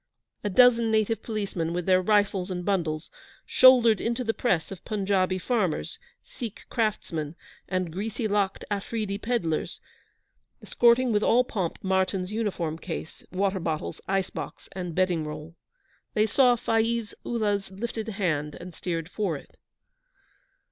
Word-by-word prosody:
A 205 - 0
dozen 235 +2 +5
native 220 0 +1
policemen, 195 -7 -3
with 175 -1 -2
their 185 -1 +4
rifles 200 -1 +2
and 180 -1 -4
bundles, 165 -5 -1 0.3
shouldered 245 -4 +6
into 235 +2 -1
the 225 -1 0
press 190 -11 0
of 190 - -8
Punjabi 190 -3 +1
farmers, 190 -5 -1 0.2
Sikh 230 -5 -8
craftsmen, 170 - -1 0.3
and 185 -3 -1
greasy 220 +4 -2
locked 200 -2 0
Afreedee 205 0 -2
pedlars, 195 -10 -1 0.8
escorting 240 +1 +3
with 210 -1 +2
all 245 +3 +4
pomp 190 -8 -3
Martyn's 190 0 0
uniform 190 -8 -2
case, 165 -2 -6
water 190 +1 0
bottles, 160 -3 -3
ice 195 -1 0
box, - - -7
and 180 -3 -5
bedding 180 -3 +2
roll. 150 +1 -7 0.6
They 215 -1 +4
saw 245 +3 +4
Faiz 225 -1 0
Ullah's 205 -4 -1
lifted 220 +3 -5
hand, 165 -9 -1
and 180 0 -9
steered 165 -1 -3
for 185 -4 -2
it. - - -16
195 Hz, 135 wpm, -27 LUFS, 180-225 Hz, 0.8 s, shouldered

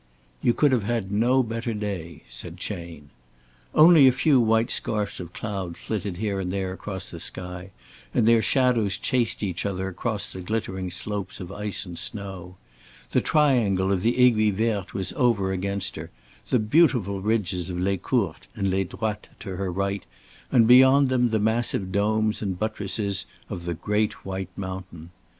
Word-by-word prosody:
"You 120 - +2
could 145 -2 +3
have 125 -3 +2
had 105 -2 -2
no 120 +5 +3
better 115 0 -3
day," 90 -7 -5
said - - -8
Chayne. 80 -4 -6 0.6
Only 155 -3 +8
a - - +7
few 135 +1 +3
white 115 0 +2
scarfs 105 -2 0
of 85 -2 -7
cloud 95 -5 -5
flitted 100 -4 -4
here 100 -1 -2
and 90 -1 -3
there 95 -1 -2
across 95 -1 -7
the 85 - -8
sky 90 +2 -7 0.4
and 115 -2 +2
their 115 -1 +5
shadows 120 -7 +2
chased 120 -5 0
each 90 -4 -2
other 95 -1 -2
across 105 +3 -2
the 95 - -8
glittering 95 -2 -3
slopes 100 +2 -4
of 90 0 -7
ice 105 0 -3
and 85 -2 -6
snow. 95 -3 -5 0.6
The - - +3
triangle 115 -11 +2
of 95 -2 +1
the 115 +5 +1
Aiguille 110 -5 +4
Verte 105 -3 -1
was 95 -2 -2
over 110 -6 +2
against 100 +1 -1
her, 80 +1 -7 0.4
the 125 - +3
beautiful 110 - +2
ridges 95 -4 0
of 90 - -4
Les 95 +2 0
Courtes 95 -3 -1
and 100 -3 0
Les 95 +1 +1
Droites 105 +3 -4
to 95 - -5
her 95 -1 -2
right 100 +2 -2 0.5
and 120 -4 +5
beyond 130 +2 +7
them 125 -2 +2
the 110 - +1
massive 110 -3 0
domes 110 +2 +1
and 95 -4 -2
buttresses 100 -1 -1 0.2
of 85 - -5
the 85 -1 -2
great 105 +4 -1
white 95 -1 -4
mountain. 95 -3 -7
100 Hz, 170 wpm, -25 LUFS, 95-115 Hz, 0.6 s, Only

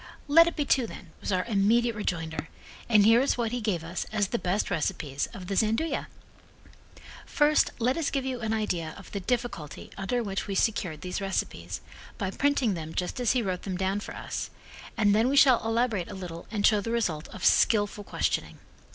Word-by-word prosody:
"Let 330 +3 +7
it 340 - -2
be 295 - 0
two, 260 -3 +2
then," 180 -5 -11
was - - -3
our 185 -1 +1
immediate 230 +2 +2
rejoinder, 165 -6 -3 0.4
and 210 -3 +6
here 225 +3 +6
is 275 - +1
what 230 -2 -1
he 245 0 -2
gave 195 -7 -1
us 170 +2 -4
as 205 -3 0
the 235 - -1
best 190 +3 -1
recipes 150 -4 -1
of 185 - -8
the 195 - -3
Gianduja. 225 +11 +1 1.2
First, 300 0 +3
let 250 +4 +1
us 325 -4 0
give 270 -1 -2
you 260 -2 -2
an 220 -1 -2
idea 180 -8 -2
of 195 - -12
the 200 - -3
difficulty 200 - -3
under 240 +5 -1
which 195 -1 -3
we 200 - -3
secured 185 -7 0
these 180 +2 -4
recipes 195 -1 -3 0.4
by 195 -3 -2
printing 275 -3 +1
them 160 -2 -6
just 180 +7 -2
as 245 -2 +2
he 250 -2 +1
wrote 185 -3 -2
them 190 -2 -4
down 190 +2 0
for - - -8
us, - - -4 0.5
and 205 -3 +4
then 225 +4 +3
we 280 - +1
shall 260 -5 +6
elaborate 225 -5 0
a - - -7
little 175 -3 -7
and 210 -2 0
show 210 -2 +5
the 230 - -5
result 180 -10 -1
of - - -6
skillful 205 -1 +3
questioning. - - -2
210 Hz, 205 wpm, -28 LUFS, 185-240 Hz, 1.2 s, Let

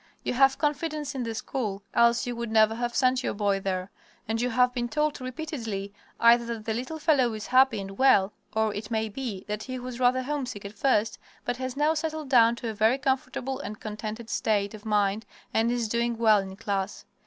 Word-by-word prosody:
You - - -1
have 270 +1 +4
confidence 300 -1 -1
in 265 - -3
the 230 -2 -3
school, 215 -4 -3
else 235 0 +4
you 245 -1 -3
would 235 0 -4
never 220 0 +4
have 240 +1 -3
sent 255 -1 +3
your - - -2
boy 200 -1 +1
there; 190 -1 -3 0.4
and 225 +1 -1
you 250 - +1
have 250 +1 +3
been 240 -1 -2
told 300 -1 0
repeatedly 245 -8 -5 0.3
either 235 +1 +6
that 230 -2 -5
the 225 - -1
little 255 +8 -4
fellow 290 -6 +3
is 215 - -6
happy 260 -3 +4
and 195 0 -8
well 210 -7 +5 0.2
or, 220 -1 +1
it 210 +1 -6
may 220 -1 -1
be, 215 -4 -5
that 210 0 -3
he 255 +3 -5
was 250 -1 -7
rather 255 +1 +3
homesick 255 -7 -4
at 200 - -7
first, 210 -2 +1 0.3
but 245 0 -1
has 260 0 -4
now 300 +2 +3
settled 310 -2 -3
down 235 -3 +5
to 235 -1 -5
a - - -3
very 220 +4 +3
comfortable 265 -1 -2
and 215 +1 -6
contented 215 +2 -6
state 205 -1 0
of 215 0 -10
mind 210 0 +1 0.3
and 225 +2 +2
is 240 -2 0
doing 235 +1 0
well 220 -2 +5
in 190 -1 -6
class. 195 0 -3
235 Hz, 210 wpm, -27 LUFS, 215-260 Hz, 0.4 s, either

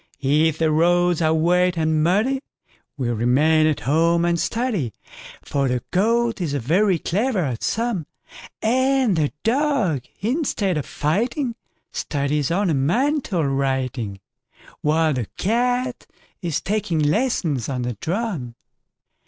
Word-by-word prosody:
If 150 +3 +2
the 160 -1 +2
roads 175 +2 +3
are 160 -1 +3
wet 175 +3 +2
and 155 -1 +1
muddyWe 215 +11 +2 0.6
remain 130 +6 +2
at 155 - 0
home 165 +4 +2
and 170 -1 +1
study,—For 160 - -3
the 125 -1 -1
Goat 230 +3 +1
is 150 -5 -1
very 175 - +2
clever 205 - 0
at 125 -5 -3
a - - -8
sum,—And 235 - -1
the 150 -3 +1
Dog, 235 - +1 0.2
instead 215 - 0
of 145 - -6
fighting, 235 - -1 0.4
Studies 145 -1 -1
ornamental 185 - +1
writing, 130 -6 -1 0.6
While 155 +1 +2
the 125 -5 -3
Cat 245 +4 0 0.3
is 170 -5 -2
taking 200 -4 -1
lessons 155 - 0
on 125 -2 -2
the 120 0 -2
drum. 160 - -3
170 Hz, 115 wpm, -22 LUFS, 145-220 Hz, 0.6 s, roads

